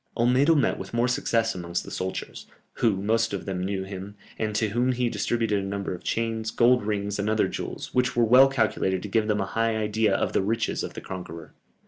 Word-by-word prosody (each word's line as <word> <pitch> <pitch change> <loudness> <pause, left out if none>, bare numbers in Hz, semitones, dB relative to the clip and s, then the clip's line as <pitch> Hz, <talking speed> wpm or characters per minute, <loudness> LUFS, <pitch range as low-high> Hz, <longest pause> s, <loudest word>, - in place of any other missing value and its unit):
Olmedo 125 +7 +4
met 145 - +1
with - - -7
more 120 +1 +2
success 115 -2 +1
amongst 85 -1 -3
the - - -10
soldiers, 95 0 -5 0.3
who 100 -5 +1
most 115 +1 +1
of 100 - -4
them 95 -2 -3
knew 95 0 -2
him, 95 +1 -8 0.2
and 110 -1 -2
to 110 0 +1
whom 120 +4 +1
he 125 -1 0
distributed 115 -4 0
a - - -4
number 100 -1 -3
of 90 - -9
chains, 115 -1 -1
gold 120 +1 +3
rings, 100 -1 -2
and 100 +1 0
other 110 0 +2
jewels, - - -6
which 125 -1 +1
were 120 -1 +4
well 125 +4 +7
calculated 110 -7 0
to - - -4
give 110 +1 +1
them 105 -1 +1
a - - -1
high 115 +3 0
idea 105 -1 +1
of - - -1
the - - +2
riches 115 +4 -1
of - - -6
the - - -6
conqueror. 85 -4 -8
110 Hz, 220 wpm, -26 LUFS, 100-115 Hz, 0.3 s, well